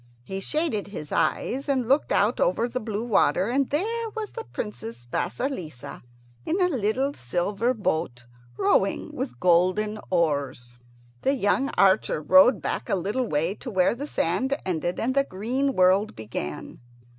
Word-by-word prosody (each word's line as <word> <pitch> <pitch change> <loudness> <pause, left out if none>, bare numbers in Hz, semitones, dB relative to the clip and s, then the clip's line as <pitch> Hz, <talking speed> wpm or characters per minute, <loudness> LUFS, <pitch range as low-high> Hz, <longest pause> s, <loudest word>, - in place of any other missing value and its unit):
He 190 +8 -5
shaded 300 - -1
his 155 -7 -8
eyes 275 +3 0
and 260 -4 +1
looked 275 +4 +2
out - - +2
over - - +2
the 255 +1 -3
blue 220 0 -3
water, 210 -2 +2
and 270 +2 +1
there 450 +9 -1
was 435 -2 -4
the - - -7
Princess 120 0 -7
Vasilissa 160 - -4 0.4
in 355 - -1
a 360 -1 +3
little 260 - 0
silver 195 - -1
boat, 160 - -2 0.3
rowing - - +1
with 120 0 -5
golden 185 +6 +2
oars. 140 -8 -1 0.4
The 275 - +2
young 265 +4 +1
archer 190 -5 +3
rode 250 - +5
back - - -3
a - - +2
little 210 +7 -1
way 160 +3 0
to 245 - -8
where 185 -5 +2
the 280 +5 -6
sand 260 - 0
ended 175 -1 -2
and 255 +3 0
the 275 0 +3
green 260 +6 -1
world 190 +4 +3
began. 105 -9 -6
210 Hz, 155 wpm, -25 LUFS, 170-265 Hz, 0.4 s, rode